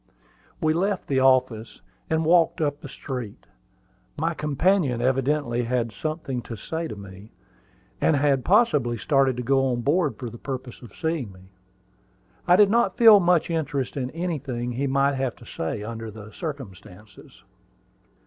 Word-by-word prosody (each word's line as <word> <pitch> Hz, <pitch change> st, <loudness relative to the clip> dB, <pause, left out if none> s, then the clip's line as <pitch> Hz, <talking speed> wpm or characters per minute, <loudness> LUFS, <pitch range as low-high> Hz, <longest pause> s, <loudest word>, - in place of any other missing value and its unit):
We 155 Hz, 0 st, +2 dB
left 190 Hz, +3 st, -1 dB
the 135 Hz, -2 st, 0 dB
office, 130 Hz, -4 st, +2 dB, 0.3 s
and 160 Hz, 0 st, +1 dB
walked 170 Hz, 0 st, +3 dB
up 145 Hz, -2 st, -1 dB
the 145 Hz, -, -9 dB
street. 125 Hz, -7 st, -7 dB, 0.7 s
My 165 Hz, +3 st, 0 dB
companion 150 Hz, -2 st, +1 dB
evidently 130 Hz, 0 st, 0 dB
had 120 Hz, -1 st, -1 dB
something 155 Hz, -3 st, -4 dB
to 115 Hz, -, -8 dB
say 160 Hz, +9 st, -4 dB
to 110 Hz, -, -7 dB
me, 100 Hz, +1 st, -12 dB, 0.7 s
and 160 Hz, -, +3 dB
had 140 Hz, -2 st, +2 dB
possibly 150 Hz, -, +3 dB
started 135 Hz, 0 st, +2 dB
to 125 Hz, -, -3 dB
go 135 Hz, +2 st, +2 dB
on 120 Hz, -2 st, -1 dB
board 145 Hz, -, +1 dB
for 125 Hz, -, -6 dB
the 120 Hz, -, -11 dB
purpose 130 Hz, -3 st, -6 dB
of 120 Hz, -, -13 dB
seeing 160 Hz, -9 st, -2 dB
me. 95 Hz, 0 st, -17 dB, 1.0 s
I 175 Hz, -, +6 dB
did 205 Hz, +1 st, +5 dB
not 235 Hz, +1 st, +2 dB
feel 225 Hz, -3 st, +8 dB
much 175 Hz, -2 st, +2 dB
interest 145 Hz, -5 st, -2 dB
in 130 Hz, -3 st, -3 dB
anything 140 Hz, -8 st, -4 dB
he 135 Hz, +4 st, -2 dB
might 140 Hz, +1 st, +2 dB
have 130 Hz, -2 st, -2 dB
to 120 Hz, -, -16 dB
say 80 Hz, +1 st, -4 dB
under 115 Hz, 0 st, -6 dB
the 105 Hz, 0 st, -11 dB
circumstances. 105 Hz, -, -10 dB
135 Hz, 160 wpm, -24 LUFS, 120-160 Hz, 1.0 s, feel